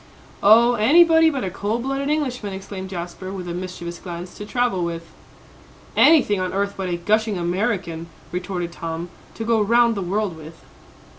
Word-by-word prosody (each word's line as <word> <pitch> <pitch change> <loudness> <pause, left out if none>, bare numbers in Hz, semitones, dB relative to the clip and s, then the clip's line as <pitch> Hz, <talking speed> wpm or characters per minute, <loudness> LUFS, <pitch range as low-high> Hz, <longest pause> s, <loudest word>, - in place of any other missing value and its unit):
"Oh, 230 +4 +6
anybody 320 +8 +5
but 275 -5 -3
a 190 - -3
cold 210 +5 -2
blooded 275 +1 -2
Englishman!" 250 -9 -2
exclaimed 190 0 -7
Jasper, 180 +1 -6
with 185 -2 -6
a 170 - -4
mischievous 175 -1 -6
glance, 175 0 -7
"to 205 - -8
travel 240 -6 0
with." 170 -1 -4 0.9
"Anything 270 -11 +5
on 185 0 -2
earth 200 +1 -1
but 190 -2 -3
a 175 - -1
gushing 215 +3 +1
American!" 175 -2 -2 0.2
retorted 180 -1 -3
Tom, 165 0 -5 0.3
"to 225 - -5
go 230 -1 +2
round 235 +2 +4
the 200 - -3
world 195 0 -1
with." 160 +1 -13
195 Hz, 165 wpm, -22 LUFS, 175-230 Hz, 0.9 s, Oh